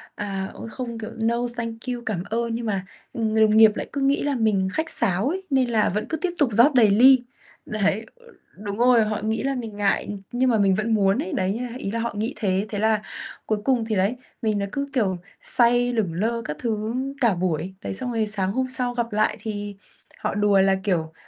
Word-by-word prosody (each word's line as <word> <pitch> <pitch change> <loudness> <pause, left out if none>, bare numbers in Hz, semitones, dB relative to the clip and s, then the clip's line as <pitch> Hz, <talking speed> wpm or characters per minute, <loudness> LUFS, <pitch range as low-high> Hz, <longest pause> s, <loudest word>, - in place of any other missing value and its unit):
à, 195 -2 -4
ôi - - -8
không 235 -1 -6
kiểu 220 +1 -6
no, 230 +1 +1 0.2
thank 230 -1 -4 0.2
you, 240 - -6
cảm 190 -5 -2
ơn. 235 +1 -1
Nhưng 230 +1 -3
mà, 195 -3 -2 0.3
ừm, 220 -2 -1
người 220 - +3
đồng 215 0 +4
nghiệp 220 -1 +8
lại - - -4
cứ 280 - -2
nghĩ 275 +1 +2
là 285 -1 0
mình 215 -5 +1
khách 320 0 0
sáo 190 +7 +2
ấy, 380 +4 -3
nên 265 -3 +2
là 220 -3 +2
vẫn 210 +3 -2
cứ 320 - -1
tiếp 350 +3 -2
tục 290 -5 +3
rót 240 +8 +6
đầy 235 -5 +5
ly, 255 +5 +7 0.5
đấy, 215 +1 0 0.6
đúng 200 -1 -4
rồi, 240 -2 +4
họ 215 0 -2
nghĩ 220 +1 -1
là 275 0 0
mình 225 -5 -6
ngại, 200 -1 0 0.2
nhưng 255 +1 +1
mà 230 - +3
mình 195 -2 +3
vẫn 215 +3 0
muốn 195 -2 +2
ấy, 190 - -6
đấy 185 0 0
nha 245 +3 -4
ý 195 - -4
là 230 - -2
họ 230 -1 -2
nghĩ 225 +5 -2
thế, 195 -1 0
thế 205 - -3
là 220 0 +2 0.4
cuối 215 - 0
cùng 250 -4 +2
thì 220 -1 -1
đấy, 195 +5 +1 0.3
mình 215 -3 0
là 200 - -1
cứ, 280 0 -3
kiểu, 200 -8 +1 0.3
say 245 0 +3
lửng 210 -8 -1
lơ 225 +7 -1
các 150 - -4
thứ 220 -1 -2 0.3
cả 230 -6 +3
buổi. 175 0 -2
Đấy, - - -3
xong 245 +5 -1
rồi 220 -2 0
sáng 195 -3 +1
hôm 260 +4 -1
sau 255 -1 0
gặp 235 -2 -3
lại 215 - +1
thì 205 -2 -5 0.4
họ - - -2
đùa 205 -1 +3
là, 195 0 +3
kiểu, 165 -5 -1
220 Hz, 235 wpm, -23 LUFS, 200-240 Hz, 0.6 s, nghiệp